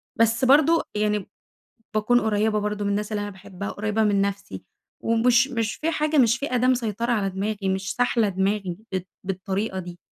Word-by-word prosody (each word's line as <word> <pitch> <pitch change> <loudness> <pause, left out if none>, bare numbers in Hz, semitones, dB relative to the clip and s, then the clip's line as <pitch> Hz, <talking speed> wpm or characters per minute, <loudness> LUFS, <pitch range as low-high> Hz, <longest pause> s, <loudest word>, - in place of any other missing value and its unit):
بس 230 +2 +2
برضه 305 +5 +5
يعني، 210 -1 0 0.7
باكون 215 +3 +3
قريبة 215 -1 +1
برضه 210 0 -2
من 200 - 0
الناس 210 +1 -2
اللي 205 - -1
أنا 205 - -4
باحبها، 195 0 -8
وقريبة 210 +1 -1
من 205 -2 +2
نفسي، 195 - -3 0.4
ومش 240 +3 +3
مش 230 -4 -2
فيه 320 - -2
حاجة، 305 -1 0
مش 235 -3 +4
فيه 280 -2 -3
أداة 250 +1 +2
مسيطرة 235 -2 0
على 200 -4 0
دماغي، 200 +1 -3
مش 190 0 -2
ساحلة 245 -3 +2
دماغي 190 -1 -1 0.2
بالط 185 -1 -2 0.2
بالطريقة 190 +1 -3
دي. 175 -1 -7
210 Hz, 180 wpm, -24 LUFS, 195-235 Hz, 0.7 s, برضه